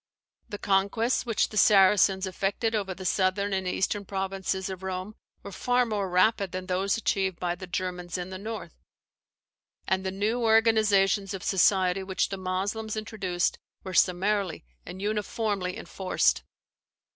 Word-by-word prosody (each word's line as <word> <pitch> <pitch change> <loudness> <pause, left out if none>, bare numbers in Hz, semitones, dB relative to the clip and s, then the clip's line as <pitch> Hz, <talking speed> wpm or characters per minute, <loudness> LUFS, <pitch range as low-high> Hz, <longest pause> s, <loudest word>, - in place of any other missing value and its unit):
The 205 - -5
conquests 200 +6 +1
which 225 -3 +1
the 215 - -6
Saracens 195 -1 +5
effected 195 +4 -1
over 195 -4 -2
the 185 - -9
southern 195 +2 +1
and 190 -1 -1
eastern 195 +3 -1
provinces 190 -1 -3
of 190 -1 -6
Rome 190 +2 -4 0.3
were 200 - -8
far 245 +5 +1
more 205 -4 -2
rapid 190 +1 +2
than 185 0 -4
those 190 +3 0
achieved 190 -4 -1
by 175 -1 -1
the 185 +1 -9
Germans 180 -1 -4
in 180 +1 -5
the 185 - -6
north; 220 +2 -6 1.1
and 190 0 +1
the 190 - -1
new 210 +5 -1
organizations 215 -3 +3
of 190 - -8
society 190 0 +3
which 190 0 -1
the 195 - -4
Moslems 200 +4 -3
introduced 195 -5 -2 0.2
were 190 - -6
summarily 190 - +1 0.2
and 190 +2 -7
uniformly 210 -2 -2
enforced. 190 -1 0
195 Hz, 145 wpm, -27 LUFS, 185-210 Hz, 1.1 s, Saracens